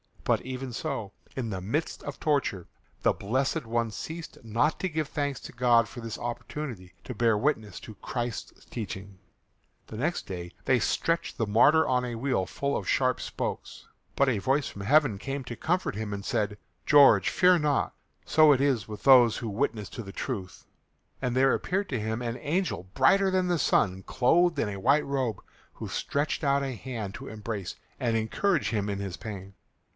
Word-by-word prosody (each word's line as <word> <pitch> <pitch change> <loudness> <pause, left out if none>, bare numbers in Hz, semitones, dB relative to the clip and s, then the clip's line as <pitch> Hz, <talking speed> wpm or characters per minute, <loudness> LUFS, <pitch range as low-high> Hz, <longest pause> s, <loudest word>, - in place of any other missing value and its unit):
But - - +2
even 130 0 -5
so, 120 -5 -4 0.2
in 125 -4 -3
the 95 -3 -4
midst 145 - -2
of 145 - -6
torture, 140 - 0 0.4
the - - +4
blessed 130 +7 -1
one 115 0 -1
ceased 160 +7 -7
not 115 +7 +1
to 185 - -1
give 155 -3 -2
thanks 145 -3 -2
to - - -9
God 120 -2 +3
for 120 - -9
this 115 -2 -5
opportunity 120 -4 -6
to 125 - -6
bear 115 -1 +2
witness 110 -7 -1
to 110 - -10
Christ's 120 +3 -5
teachings. 100 -3 -7 0.7
The 110 - -8
next 160 +9 -1
day 90 -2 -6
they 130 -2 +4
stretched 165 +8 0
the 115 - +1
martyr 140 +10 +5
on 125 -1 +1
a 120 -1 -4
wheel 120 -5 0
full 140 0 -1
of - - -6
sharp 130 -1 +2
spokes. - - -5 0.3
But 140 -1 +3
a 115 -5 +1
voice 135 +6 +1
from 100 - -8
heaven 135 -2 +4
came 135 +4 -4
to 120 - -6
comfort 170 - -1
him 105 -1 -4
and 100 0 -5
said, 105 -1 -1 0.3
"George, 135 -10 +7
fear 180 -1 +5
not; 150 -2 +1 0.3
so 155 -1 +6
it 135 - +1
is 130 -8 +1
with 105 -2 -8
those 125 -4 +7
who 115 - -4
witness 105 0 -2
to 120 - -7
the 100 -3 -9
truth." 100 -9 -5 0.6
And 125 -2 -1
there 135 +1 +4
appeared 195 +2 -1
to 130 - -1
him 110 +2 -2
an 120 0 -3
angel 155 - -2
brighter 195 +9 +4
than 185 -1 +1
the 175 -2 +1
sun, 95 -7 +2
clothed 165 - +3
in 115 - 0
a 100 -1 -5
white 140 +8 +3
robe, 130 -6 -2 0.3
who - - -7
stretched 145 +3 -1
out 140 -1 +2
a 135 -1 -2
hand 110 -4 -5
to - - -8
embrace 105 -3 -5 0.2
and 115 -2 0
encourage 150 - +1
him 105 -2 -1
in 100 - -2
his 100 -3 -5
pain. 100 -3 -8
125 Hz, 190 wpm, -28 LUFS, 105-145 Hz, 0.7 s, George